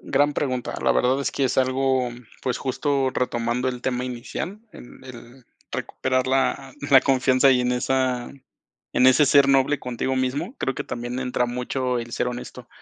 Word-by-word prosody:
Gran 145 +2 +1
pregunta. 130 -4 -2
La - - +3
verdad 130 +2 +2
es 140 - -2
que 140 - 0
es 130 - 0
algo, 130 -1 +1 0.3
pues 125 -1 -1
justo 135 0 0
retomando 120 0 -1
el 125 -1 -4
tema 125 -1 -1
inicial, 130 - -5
en 120 - -13
el 125 0 -12 0.3
recuperar 130 0 -1
la 135 0 0 0.2
la 135 -1 +8
confianza 130 0 +3
y 125 -1 +4
en 125 0 0
esa 125 -1 0 0.6
en 125 - +4
ese 130 +3 +6
ser 140 0 +6
noble 135 +1 +3
contigo 125 +1 -2
mismo 140 - -2
creo 130 - -1
que - - -4
también 120 +1 -5
entra 125 -1 0
mucho 125 +1 -2
el 115 0 -6
ser - - -1
honesto, 125 0 -8
130 Hz, 175 wpm, -23 LUFS, 125-135 Hz, 0.6 s, la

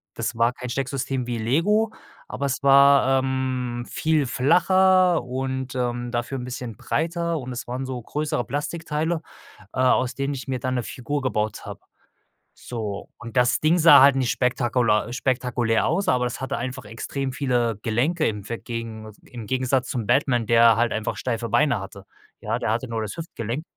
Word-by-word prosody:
das - - -3
war 115 +1 +3
kein 125 0 -7
Stecksystem 135 0 -2
wie 120 -1 -2
Lego, 190 - +1 0.3
aber 140 - -4
es 135 - -2
war, 140 -1 +6
ähm, 130 -2 -2
viel 155 -2 +1
flacher 180 +5 +3
und, 130 +1 -4
ähm, 120 -1 -2
dafür 120 +3 -2
'n 125 - -5
bisschen 125 -2 -6
breiter 170 +3 -1
und 130 -1 -7
es 120 - -6
waren 125 +2 -4
so 130 -2 -5
größere 145 +1 -2
Plastikteile, 155 +4 -2 0.5
äh, - - -4
aus 130 -1 +3
denen 140 +1 -2
ich 130 -1 -7
mir 130 -1 -1
dann 130 +1 -2
'ne 125 - -1
Figur 140 +4 -4
gebaut 110 -5 -2
habe, - - -8 0.8
so. 105 -4 -6
Und 120 +1 -10
das 125 -1 +3
Ding 160 +3 +3
sah 160 -3 +8
halt 140 0 +6
nicht 130 -3 +1
spektakular 120 -2 +1
spektakulär 125 -3 0
aus, 190 +5 0
aber 125 -1 +2
das 125 - -4
hatte 135 +1 -3
einfach 130 -1 -5
extrem 130 +5 -4
viele 125 -5 0
Gelenke 145 +9 +1
im 105 -2 -3
ve 115 - -3
gegen 115 -2 -6
im 115 -3 -9
Gegensatz 130 +1 0
zum 120 -4 -3
Batman, 125 -5 +2
der 115 -1 +6
halt 120 +1 +2
einfach 110 0 -2
steife 115 -2 -3
Beine 140 0 +3
hatte, 95 0 -10 0.4
ja, - - -2
der 100 - -2
hatte 120 +3 -2
nur 115 -1 -3
das 105 - -5
Hüftgelenk. 145 -5 -5
130 Hz, 175 wpm, -24 LUFS, 120-140 Hz, 0.8 s, sah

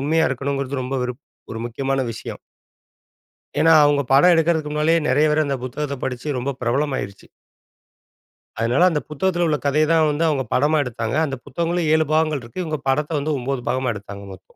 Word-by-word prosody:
உண்மையா 160 +3 +2
இருக்கணுங்கிறது 140 0 -2
ரொம்ப 130 +2 -3
விருப் 125 +3 -6 0.3
ஒரு 115 - -5
முக்கியமான 135 +3 -2
விஷயம். - - -8 1.2
ஏன்னா, 165 +2 +5
அவங்க 145 -1 +3
படம் 145 +7 +6
எடுக்குறதுக்கு 160 -2 +1
முன்னாலயே 155 +2 +2
நெறைய 145 +4 +3
பேர் 155 0 +2
அந்த 140 -1 -1
புத்தகத்த 140 +3 -4
படிச்சு, 125 +2 -4
ரொம்ப 130 +3 -2
பிரபலமாயிருச்சு. 125 -5 -2 1.3
அதனால 125 +11 +3
அந்த 150 -4 -1
புத்தகத்துல 175 +3 0
உள்ள 150 -2 +1
கதைய 150 +2 +3
தான் 160 -1 +4
வந்து 150 +2 0
அவங்க 140 -3 0
படமாக 150 +2 +2
எடுத்தாங்க. 115 -1 -3
அந்த 140 -3 -4
புத்தகங்களும் 170 +3 -1
7 160 0 +3
பாகங்கள் 155 -3 +1
இருக்கு. 120 +11 -6
இவுங்க 155 -3 -3
படத்த 150 +3 0
வந்து 150 +1 -1
9 130 0 -3
பாகமா 130 -1 0
எடுத்தாங்க 100 0 -9
மொத்தம். 95 0 -17
145 Hz, 170 wpm, -21 LUFS, 130-155 Hz, 1.3 s, படம்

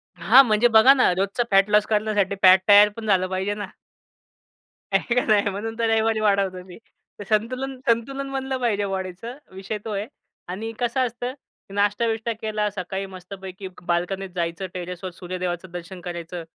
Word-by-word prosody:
हां, 215 +10 +7
म्हणजे 220 +2 +3
बघा 225 +4 +7
ना, 255 -8 +3
रोजचा 195 +6 0
फॅट 195 +1 +4
लॉस 210 0 +4
करण्यासाठी 210 -2 0
फॅट 185 0 +8
तयार 205 0 +8
पण 225 -1 -7
झालं 185 -2 +2
पाहिजे 190 +2 -2
ना. 205 -2 -5 1.3
आहे 235 - +1
काय 250 - +2
नाही 205 -2 +3
म्हणून 220 +3 -5
तर 230 -1 +1
रविवारी 225 0 +2
वाढवतो 195 -3 +1
मी. 180 -2 -12 0.4
तर 205 - -5
संतुलन 255 +5 -1
संतुलन 270 +4 0
बनलं 265 0 -2
पाहिजे 205 -4 0
बॉडीचं 190 +5 -5 0.2
विषय 195 +3 -5
तो 220 - -4
आहे 200 +1 -2 0.4
आणि 220 +5 -4
कसं 250 +1 +1
असतं 245 +2 -5 0.4
नाश्ता-बिष्टा 220 +3 0
केला, 215 -1 -1
सकाळी 190 0 -4
मस्तपैकी 190 0 -9 0.2
बाल्कनीत 185 +3 -1
जायचं. 170 +2 -2
टेरेसवर 180 +1 -6
सूर्यदेवाचं 180 0 -5
दर्शन 180 +1 -8
करायचं. 175 -1 -6
205 Hz, 160 wpm, -23 LUFS, 185-225 Hz, 1.3 s, फॅट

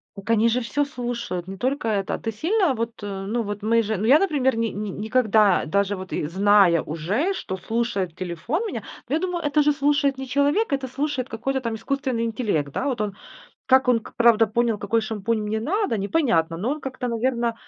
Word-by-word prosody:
Так 200 +1 -10
они 230 0 +4
же 240 +2 +1
всё 285 +4 -1
слушают, 240 - -4
не 195 0 -7
только 260 +2 -1
это. 200 -3 -1
Ты 225 - -3
сильно 335 - +1
вот, 230 -1 -4
э, 195 -1 -5
ну, 235 +3 0
вот 205 0 -5
мы 230 +2 +3
же 215 0 -2
ну, 205 - -2
я, 280 +5 +7
например, 275 -10 +1
ни 230 0 +1
ни 205 +1 -4
никогда 215 -1 +2
даже 200 +4 0
вот 185 0 -8
и 150 - -1
зная 190 -1 +4
уже, 195 - -1
что 190 - -5
слушает 200 -4 -2
телефон 185 - -3
меня, - - -4 0.3
ну, - - -1
я - - +1
думаю, 360 -1 -2
это 295 +1 +3
же 295 0 +3
слушает 285 -1 +1
не 265 - -4
человек, 285 - +1
это 270 -1 -1
слушает 270 0 -3
какой-то 265 +5 -2
там 230 -2 -3
искусственный 255 +1 -2
интеллект. 210 - -1
Да, - - -2
вот 255 -6 -1
он, 210 -2 -2 0.5
как 260 -1 +4
он 245 -2 +5
к - - -13
правда 230 -1 +5
понял, 230 0 0
какой 230 +3 0
шампунь 215 0 -2
мне 215 +1 -2
надо, 380 - 0
непонятно, 195 - +1
но 210 +9 -2
он 300 +2 -3
как-то, 260 -2 -4
наверно, 235 0 0
230 Hz, 210 wpm, -23 LUFS, 205-270 Hz, 0.5 s, я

